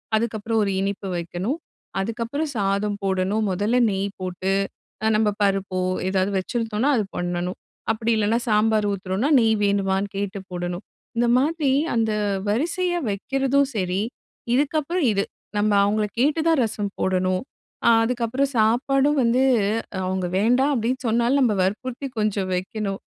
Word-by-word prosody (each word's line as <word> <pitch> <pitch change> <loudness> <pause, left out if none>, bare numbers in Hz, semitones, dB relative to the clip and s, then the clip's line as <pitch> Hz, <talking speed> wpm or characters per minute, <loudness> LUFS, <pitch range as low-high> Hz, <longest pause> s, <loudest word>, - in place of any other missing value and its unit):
அதுக்கப்புறம் 220 0 0
ஒரு 200 - 0
இனிப்பு 200 0 -3
வைக்கணும். 180 - -3 0.4
அதுக்கப்புறம் 230 +9 -2
சாதம் 200 +1 0
போடணும். 195 +3 0
முதல்ல 205 +6 +1
நெய் 195 0 -1
போட்டு, 185 +1 -2 0.5
அ - - +4
நம்ம 215 0 +3
பருப்போ 195 -2 +1 0.3
ஏதாவது 190 +1 +1
வச்சுருந்தோம்னா 225 +5 -1
அது 215 - +1
பண்ணணும். 175 +1 -2 0.3
அப்படி 225 +1 -1
இல்லைனா? 215 +2 +2
சாம்பார் 215 -1 +3
ஊத்துறோம்னா 195 +7 -1
நெய் 225 -1 +3
வேணுமான்னு 200 0 +1
கேட்டு 200 0 -3
போடணும். 175 +1 -4 0.3
இந்த 240 - +3
மாதிரி 300 0 +1 0.2
அந்த 225 -1 +1 0.4
வரிசையா 350 - 0
வைக்கிறதும் 270 +6 +1
சரி, 185 -1 0 0.5
இதுக்கப்புறம் 305 +3 +1
இது. 200 -1 0 0.3
நம்ம 210 +1 +2
அவங்களை 210 +1 +1
கேட்டுதான் 310 +1 +3
ரசம் 205 -2 -3
போடணும். 185 +2 +1 0.4
அ - - +8
அதுக்கப்பறம் 250 +3 0
சாப்பாடும் 270 +6 +3
வந்து 240 +3 +3 0.6
அவங்க 185 -1 -1
வேண்டாம், 250 +7 +3
அப்படின்னு 245 +2 -1
சொன்னாலும் 240 +5 +2
நம்ப 215 -4 +2
வற்புறுத்தி 250 +8 -3
கொஞ்சம் 205 -3 0
வைக்கணும். 195 +1 -3
215 Hz, 130 wpm, -23 LUFS, 195-250 Hz, 0.6 s, அ